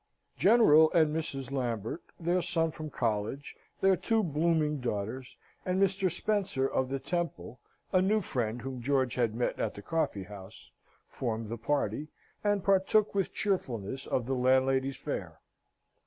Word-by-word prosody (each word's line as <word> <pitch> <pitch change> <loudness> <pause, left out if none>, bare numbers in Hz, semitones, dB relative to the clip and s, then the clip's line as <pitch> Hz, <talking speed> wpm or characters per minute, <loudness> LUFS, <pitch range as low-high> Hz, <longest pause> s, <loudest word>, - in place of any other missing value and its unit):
General 160 - +6
and 155 -3 +3
Mrs. 135 -4 -3
Lambert, 120 - -2 0.2
their 175 +2 +1
son 165 -2 0
from 155 0 -7
college, 115 +2 -2 0.3
their 195 0 +5
two 220 +5 +1
blooming 155 -2 +1
daughters, 120 +3 -4 0.3
and 185 +1 0
Mr. 195 -1 +2
Spencer 185 -7 0
of 130 -1 -1
the 135 - -1
Temple, 135 - -4 0.3
a 185 - +5
new 210 +3 +3
friend 120 - -3
whom 130 -2 -5
George 130 -1 +1
had 115 -4 0
met 120 - -1
at 110 - -1
the 100 - -9
coffee 160 -11 -1
house, 95 +1 -12 0.4
formed 115 -3 -3
the 115 - -3
party, 145 +5 -1 0.4
and 205 -2 +1
partook 195 +2 +3
with 195 -2 0
cheerfulness 130 - -2
of 125 - 0
the 135 - -1
landlady's 130 +1 +2
fare. 95 - -5
140 Hz, 150 wpm, -30 LUFS, 120-175 Hz, 0.4 s, General